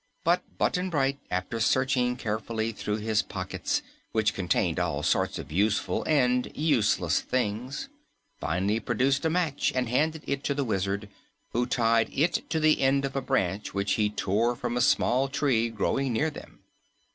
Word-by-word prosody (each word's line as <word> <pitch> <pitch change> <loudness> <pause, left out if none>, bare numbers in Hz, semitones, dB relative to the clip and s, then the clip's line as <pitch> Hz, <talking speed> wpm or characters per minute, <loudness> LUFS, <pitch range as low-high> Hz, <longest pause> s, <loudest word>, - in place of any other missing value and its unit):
But 175 +2 0
Button 180 +1 0
Bright, 140 -4 0
after 95 +5 -2
searching 125 +1 +2
carefully 110 -1 -2
through 105 -1 -3
his 110 0 +1
pockets, - - -3 0.3
which 110 -1 +2
contained 90 -2 0
all 80 -5 -1
sorts - - +1
of 70 - -8
useful 100 +5 +1
and 125 -5 +2
useless 145 -9 +2
things, 125 - -2 0.5
finally 95 +7 0
produced 130 +6 +1
a - - +3
match 160 -4 0
and 130 -1 +1
handed 155 +6 0
it 140 0 -2
to 140 - 0
the 140 - 0
Wizard, 100 -1 -1 0.4
who 120 +1 0
tied 115 -2 +2
it 160 +5 0
to 160 - 0
the 155 0 +3
end 135 +1 +3
of 135 - -5
a 135 - 0
branch 95 -4 -1
which 100 0 0
he 105 -1 +2
tore 105 +4 0
from 120 0 -3
a 125 - +1
small 130 +3 +3
tree 130 -4 +1
growing 125 +5 0
near 150 +8 +1
them. - - -12
120 Hz, 165 wpm, -27 LUFS, 105-140 Hz, 0.5 s, a